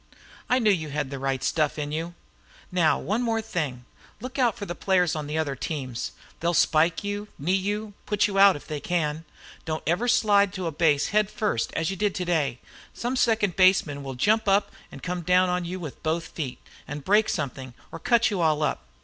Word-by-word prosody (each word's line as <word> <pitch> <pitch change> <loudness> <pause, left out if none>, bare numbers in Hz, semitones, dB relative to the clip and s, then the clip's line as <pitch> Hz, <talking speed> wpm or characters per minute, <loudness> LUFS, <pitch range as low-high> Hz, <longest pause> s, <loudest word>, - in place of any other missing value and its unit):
I 250 - +4
knew 220 -4 +4
you 160 -5 -1
had 145 -1 -3
the 140 - -5
right 135 -1 -1
stuff 155 -2 +1
in 145 -1 -3
you. 165 +3 -4 0.6
Now, 175 -4 +3
one 215 +5 -1 0.2
thing 160 - -2
more. 125 0 -15 0.4
Look 255 +4 -6
out 240 -2 +2
for 205 - -5
the 175 - -4
players 180 -2 +1
on 150 -2 -4
the 150 +1 -3
other 150 -4 -1
teams. 130 -4 -4 0.3
They'll 170 +1 0
spike 165 +4 +3
you, 205 +1 -3
knee 165 +7 0
you, 205 +2 -1
put 210 0 +2
you 195 -2 0
out, 200 0 +8
if 145 - -9
they 150 -1 -4
can. 160 -1 -1 0.4
Don't 155 -1 -3
ever 180 +9 +1
slide 205 -5 +4
to 185 -2 -4
a 165 - -1
base 150 -2 +2
head 210 -1 +2
first, 205 - -1
as 165 +2 -1
you - - -3
did 205 +1 0
today. 165 -8 0 0.4
Some 245 +2 -2
second 220 -7 +2
baseman 185 -6 +3
will 135 -1 -6
jump 215 - +2
up 200 +1 +3 0.2
and 135 - -11
come 180 +1 -3
down 180 +2 +3
on 180 0 -1
you 180 +2 -4
with 155 -6 -8
both 165 +1 -1
feet, 135 -6 -5 0.3
and 150 -1 -6
break 210 +2 +4
something, 135 - -4 0.2
or - - -7
cut 235 -1 +3
you 195 -4 -1
all 155 -2 +2
up. 70 - -1
175 Hz, 210 wpm, -26 LUFS, 150-205 Hz, 0.6 s, out